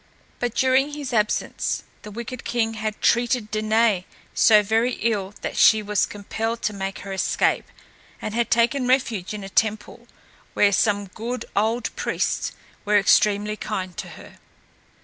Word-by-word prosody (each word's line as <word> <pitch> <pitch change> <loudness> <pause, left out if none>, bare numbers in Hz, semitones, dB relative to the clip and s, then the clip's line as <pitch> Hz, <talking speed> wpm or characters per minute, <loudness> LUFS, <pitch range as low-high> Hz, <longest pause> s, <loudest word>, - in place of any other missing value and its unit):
But 245 -1 -2
during 265 +3 +2
his 285 -4 -5
absence, 210 -2 0 0.2
the 210 - -9
wicked 235 +3 -7
king 225 -2 -1
had 215 -1 -4
treated 240 -2 +2
Danaë 215 -3 +2 0.3
so 215 -2 +6
very 225 +4 +1
ill 210 -3 -2
that - - -4
she 220 -1 +5
was 210 0 +1
compelled 225 +3 -4
to 215 - 0
make 195 -1 -5
her 195 - -5
escape, 190 - +1 0.5
and 215 - -5
had 235 +1 0
taken 240 +2 +2
refuge 240 -8 +1
in 210 -2 -6
a - - -6
temple, 220 +3 -1 0.5
where 205 - +4
some 205 0 +2
good 235 +6 -5
old 225 +4 0
priests - - -1 0.3
were 210 0 +3
extremely 205 +1 +3
kind 185 -4 -4
to - - -5
her. - - -14
215 Hz, 150 wpm, -23 LUFS, 205-235 Hz, 0.5 s, so